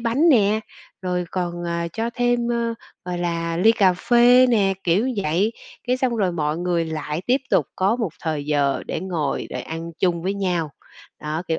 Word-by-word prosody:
bánh 250 Hz, +8 st, +2 dB
nè, 215 Hz, -5 st, +4 dB, 0.4 s
rồi 180 Hz, -1 st, -1 dB
còn, 175 Hz, -1 st, -3 dB
à, 170 Hz, 0 st, -2 dB
cho 230 Hz, +1 st, -2 dB
thêm, 245 Hz, -1 st, +1 dB
ờ, 235 Hz, -1 st, -1 dB, 0.3 s
gọi 180 Hz, -1 st, -3 dB
là, 170 Hz, -1 st, -2 dB
ly 220 Hz, +6 st, +5 dB
cà 195 Hz, -5 st, +4 dB
phê 245 Hz, +5 st, +5 dB
nè, 200 Hz, -5 st, +3 dB
kiểu 195 Hz, +9 st, +2 dB
vậy, 190 Hz, +8 st, +1 dB, 0.3 s
cái 250 Hz, +1 st, +2 dB
xong 255 Hz, -2 st, 0 dB
rồi 190 Hz, -4 st, +1 dB
mọi 155 Hz, -1 st, -1 dB
người 175 Hz, -2 st, 0 dB
lại 155 Hz, 0 st, -4 dB
tiếp 255 Hz, +3 st, +3 dB
tục 145 Hz, -, +3 dB
có 200 Hz, +5 st, +2 dB
một 220 Hz, -9 st, -2 dB
thời 155 Hz, -3 st, -2 dB
giờ 145 Hz, -2 st, +1 dB
để -, -, -3 dB
ngồi 165 Hz, -6 st, -2 dB
để -, -, -4 dB
ăn 165 Hz, +1 st, -6 dB
chung 170 Hz, -2 st, +1 dB
với 195 Hz, +3 st, -1 dB
nhau. 175 Hz, -6 st, -1 dB, 0.5 s
Đó, 155 Hz, +2 st, -3 dB
kiểu, 160 Hz, -, 0 dB
180 Hz, 190 wpm, -22 LUFS, 165-230 Hz, 0.5 s, ly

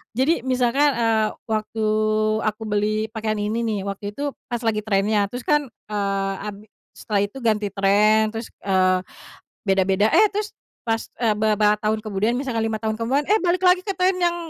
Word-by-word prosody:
Jadi 265 Hz, 0 st, +1 dB
misalkan, 260 Hz, +3 st, +3 dB
eee, 225 Hz, -2 st, +2 dB, 0.2 s
waktu 220 Hz, 0 st, -2 dB, 0.6 s
aku 215 Hz, +1 st, -3 dB
beli 215 Hz, +1 st, 0 dB
pakaian 215 Hz, -1 st, -2 dB
ini 215 Hz, +3 st, -1 dB
nih, 215 Hz, -2 st, -1 dB
waktu 200 Hz, +1 st, -5 dB
itu 285 Hz, 0 st, -2 dB, 0.2 s
pas 240 Hz, -, -1 dB
lagi 220 Hz, -2 st, +1 dB
trend-nya, 205 Hz, 0 st, +1 dB
terus 245 Hz, 0 st, -6 dB
kan, 295 Hz, -2 st, +2 dB
eee, 200 Hz, -2 st, -2 dB, 0.2 s
ad 200 Hz, -, -11 dB, 0.4 s
setelah 205 Hz, -2 st, -1 dB
itu 205 Hz, -, -13 dB
ganti 215 Hz, -2 st, +1 dB
trend, 210 Hz, +3 st, +3 dB
terus, 225 Hz, +1 st, -4 dB, 0.2 s
eee, 185 Hz, -1 st, +3 dB, 0.7 s
beda-beda, 195 Hz, +2 st, +3 dB
eh 430 Hz, -, +6 dB
terus 420 Hz, +1 st, -3 dB, 0.3 s
pas, 225 Hz, -1 st, 0 dB, 0.2 s
eee, 230 Hz, -2 st, +3 dB
beberapa 210 Hz, -1 st, +3 dB
tahun 215 Hz, 0 st, -1 dB
kemudian 215 Hz, +2 st, 0 dB
misalkan 255 Hz, -3 st, -2 dB
5 220 Hz, -1 st, -3 dB
tahun 220 Hz, 0 st, -1 dB
kemudian, 265 Hz, +6 st, +1 dB
eh 430 Hz, -, +5 dB
balik 360 Hz, 0 st, 0 dB
lagi 360 Hz, 0 st, +5 dB
ke 395 Hz, -, -1 dB
trend 365 Hz, +1 st, +2 dB
yang 345 Hz, -1 st, +2 dB
220 Hz, 175 wpm, -22 LUFS, 210-250 Hz, 0.7 s, eh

